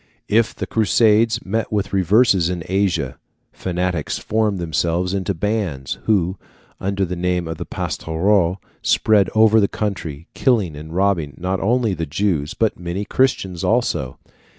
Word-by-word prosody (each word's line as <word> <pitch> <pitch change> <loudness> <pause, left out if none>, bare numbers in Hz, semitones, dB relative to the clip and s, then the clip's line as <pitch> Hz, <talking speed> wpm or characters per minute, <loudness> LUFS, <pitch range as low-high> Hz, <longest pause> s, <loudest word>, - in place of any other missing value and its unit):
If 115 +1 +2
the - - -4
Crusaders 110 +1 +2
met 110 +3 -2
with 105 -2 -1
reverses 95 -1 +3
in 90 -2 -3
Asia, 95 -9 0 0.3
fanatics 90 -3 -2
formed 110 -2 0
themselves 85 +2 -1
into 100 0 -1
bands, 90 -8 -2
who, 95 -4 +1 0.4
under 100 0 -1
the 90 0 -4
name 90 -1 -1
of 80 -1 -5
Pastoureaux, 90 +2 0 0.2
spread 105 -4 +3
over 110 0 +6
the 100 - +3
country, 85 -9 -4
killing 105 - +1
and 75 +2 -9
robbing 90 -8 +1
not 95 +2 -2
only 115 0 +1
the 80 -2 -3
Jews, 80 -2 -1
but 110 -2 0
many 90 +3 -4
Christians 95 -9 0
also. 65 -1 0
95 Hz, 140 wpm, -20 LUFS, 85-105 Hz, 0.4 s, over